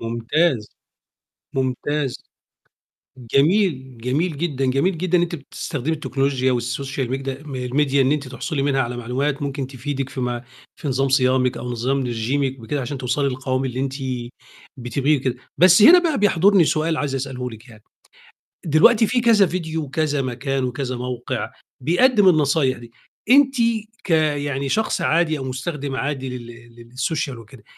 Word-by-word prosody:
ممتاز. 115 +2 0 0.9
ممتاز. 135 +1 -1 1.2
جميل، 140 - +2
جميل 145 +7 -1
جدًا، 140 -4 -1
جميل 150 +8 +1
جدًا 180 +1 +1
إن - - +2
أنتِ 175 -1 -2
بتستخدمي 145 0 -4
التكنولوجيا 135 -4 0
والSocial 125 +2 -3
Media 135 +2 -4
م 130 -3 -4
الMedia 140 +2 0
إن 135 0 +4
أنتِ 145 -3 -2
تحصلي 140 +3 -3
منها 135 -1 +1
على 120 -1 -2
معلومات 135 +5 -2
ممكن 140 -1 -3
تفيدِك 135 +1 -4
في 135 - -6
ما 120 -1 -3 0.3
في 145 - -5
نظام 135 +1 +1
صيامِك 130 -1 +2
أو 125 - -5
نظام 125 +3 -1
رجيمِك 130 +3 -1
بكده 140 +6 -3
عشان 135 +2 -4
توصلي 130 +2 0
للقوام 130 0 -2
اللي 130 -1 -3
أنتِ 135 0 -2 0.8
بتبغيه 135 +4 0
وكده. 130 -1 -2 0.2
بس 185 +3 +7
هنا 340 +10 +9
بقى 330 -5 0
بيحضرني 200 -2 +4
سؤال 160 +1 0
عايز 145 -3 -2
أسأله 130 -2 -4
لِك 110 +2 -13
يعني، 110 -2 -16 0.8
دلوقتي 210 +9 +5
في 245 +4 +1
كذا 225 -4 +5
فيديو، 160 -3 -3
وكذا 145 0 -1
مكان، 130 +1 -2
وكذا 125 0 -3
موقع 125 0 -4 0.3
بيقدّم 205 - +4
النصايح 150 -5 +2
دي، 120 -1 -13 0.4
أنتِ 270 0 +6 0.5
كيعني 145 -5 0
شخص 220 +10 0
عادي 160 -1 +2
أو 135 - -5
مستخدم 135 +2 -4
عادي 135 -1 -3
لل 120 0 -13
للSocial 135 0 -2
وكده، 115 0 -15
135 Hz, 150 wpm, -21 LUFS, 125-155 Hz, 1.2 s, هنا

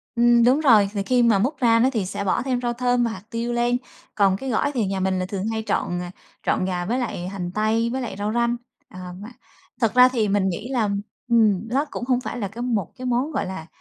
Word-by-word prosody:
Ừm, 235 0 +5
đúng 260 +5 +4
rồi. 220 -9 +5
Vì 200 -1 -1
khi 250 +2 +2
mà 220 -4 +4
múc 270 +8 0
ra 230 -3 +4
đó, 255 +3 +4
thì 210 -5 0
sẽ 200 +2 -4
bỏ 190 - +1
thêm 250 -2 -1
rau 240 -1 -1
thơm 245 0 +1
và 230 - 0
hạt 220 - -8
tiêu 235 +1 -3
lên. 240 +1 +1 0.4
Còn 195 -2 +3
cái 265 +3 -5
gỏi 270 +5 +1
thì 235 -6 0
nhà 195 0 -2
mình 190 0 0
là 185 - -1
thường 195 +2 -4
hay 220 0 -2
trộn, 175 0 -1
à, 180 0 -6 0.3
trộn 185 - +1
gà 180 -1 -2
với 240 +7 -1
lại 180 -7 -3
hành 180 -2 -5
tây, 220 +3 +1
với 265 +1 -2
lại 220 -6 -5
rau 210 +2 -2
răm. 235 0 +1 0.3
Ờ, 185 - -11 0.2
mà 205 +3 -9 0.5
thật 225 -1 +2
ra 250 0 +8
thì 225 -5 0
mình 195 -1 +2
nghĩ 215 +7 -5
là 225 -5 +1 0.4
ừm, 220 -3 +3
nó 270 +5 0
cũng 245 - -4
không 250 -1 +1
phải - - -5
là 200 -3 -3
một 225 -8 -1
cái 255 - -8
món 250 +5 0
gọi 270 - -1
là 185 -4 -6
230 Hz, 255 wpm, -23 LUFS, 195-245 Hz, 0.5 s, ra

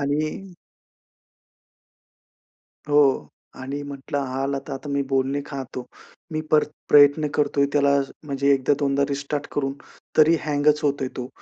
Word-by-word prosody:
आणि 155 +7 -2 2.4
हो. 145 -2 +3 0.3
आणि 140 +2 -5
म्हटलं, 145 +1 -5
हा 130 +1 -3
आला 140 0 -1 0.2
आता 135 +2 -6
मी 140 - +1
बोलणे 135 +1 +1
खातो. 135 -3 -6 0.5
मी 155 - -1
पर 155 -1 +5 0.2
प्रयत्न 145 +1 +6
करतोय 145 -1 +2
त्याला 140 -1 +3 0.3
म्हणजे 140 -1 0
एकदा 135 +2 +1
दोनदा 140 -1 +1
रिस्टार्ट 140 +1 -3
करून, 135 -2 -1 0.4
तरी 160 +2 +6
हँगच 150 0 +2
होतोय 140 -2 0
तो. 125 0 -5
140 Hz, 125 wpm, -23 LUFS, 135-145 Hz, 2.4 s, प्रयत्न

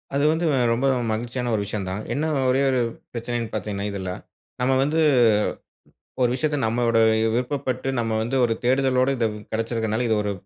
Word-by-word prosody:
அது 140 - +2
வந்து 160 +2 0 0.3
ரொம்ப 125 +4 -1 0.3
மகிழ்ச்சியான 120 +2 -2
ஒரு 105 - 0
விஷயம் 100 -2 -4
தான். 95 +3 -3
என்ன 150 +3 -1 0.2
ஒரே 130 +2 +2
ஒரு 130 -2 +2 0.3
பிரச்சனன்னு 120 -1 -4
பாத்தீங்கன்னா 100 -1 -3
இதுல, 95 -2 -4 0.5
நம்ம 125 +1 +2
வந்து 150 +3 0 1.2
ஒரு 125 - +4
விஷயத்த 150 +3 -1
நம்மளோட 115 0 +1 0.4
விருப்பப்பட்டு 130 +1 -2
நம்ம 115 -1 -1
வந்து 120 +4 -2
ஒரு 115 -2 +2
தேடுதலோட 130 +1 +2
இது 115 -2 +2 0.3
கெடச்சிருக்கனால, 115 0 -1
இது 110 - +2
ஒரு 105 - -1
120 Hz, 155 wpm, -23 LUFS, 110-130 Hz, 1.2 s, ஒரு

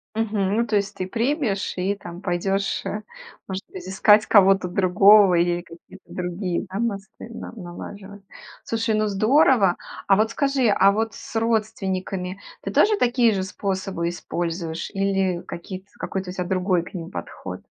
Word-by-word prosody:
Мгм, 210 -2 0
ну, 235 - +2
то 215 - 0
есть 200 0 0
ты 185 -2 -4
примешь 235 - -1
и 190 +2 -1
там 175 -2 -10
пойдешь, 195 +2 -1
э, 210 - -3 0.5
может 190 0 -4
быть, 185 -1 -9
искать 210 +2 +4
кого-то 195 -2 +5
другого 195 +2 +6
или 175 0 +2
какие-то 170 +2 -15
другие, 180 +1 -3
да, 195 - -4
мосты 215 -1 -4
на 230 - -8
налаживать. 200 +1 -9 0.4
Слушай, 225 0 -1
ну 215 0 +1
здорово! 215 - +4 0.3
А 195 - +6
вот 215 +2 +2
скажи, 275 0 +1
а 200 -1 +5
вот 225 +2 -2
с - - -11
родственниками 195 -4 -1 0.2
ты - - -4
тоже 425 0 +4
такие 240 -2 +3
же 195 - -1
способы 190 -2 -3
используешь 170 -1 -4
или 195 -2 0
какие-то 185 +3 -8
какой-то 190 -1 -4
у - - -5
тебя 180 - -2
другой 185 -1 +1
к - - -12
ним 170 -2 -6
подход? - - -7
195 Hz, 160 wpm, -23 LUFS, 185-215 Hz, 0.5 s, другого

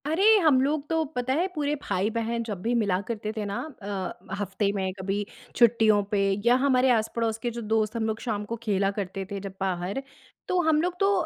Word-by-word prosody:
अरे 320 +6 +1 0.2
हम 300 -6 +5
लोग 290 +2 0
तो 325 -1 +2
पता 250 +1 0
है 340 +6 +1
पूरे 295 -1 0
भाई-बहन 225 +4 -1
जब 205 -5 -5
भी 235 +4 0
मिला 200 -5 +2
करते 215 -2 -3
थे 215 - -2
ना। 200 0 -3 0.3
अ, 195 -1 -5
हफ्ते 200 0 0
में 190 -1 -1
कभी 195 +2 -2 0.3
छुट्टियों 225 -3 +5
पे 205 - +3 0.3
या 240 +1 +6
हमारे 260 -2 +4
आस-पड़ोस 225 -1 0
के 240 - +1
जो - - -3
दोस्त 220 0 +1
हम 225 -1 0
लोग 220 0 -2
शाम 210 -4 -2
को 230 - -4
खेला 200 -3 +1
करते 195 -1 -4
थे 200 - -3
जब 195 -1 -7
बाहर। 190 +5 -1 0.5
तो 365 - +1
हम 305 -1 +4
लोग 360 +1 -2
तो 395 0 +4
220 Hz, 210 wpm, -26 LUFS, 200-255 Hz, 0.5 s, या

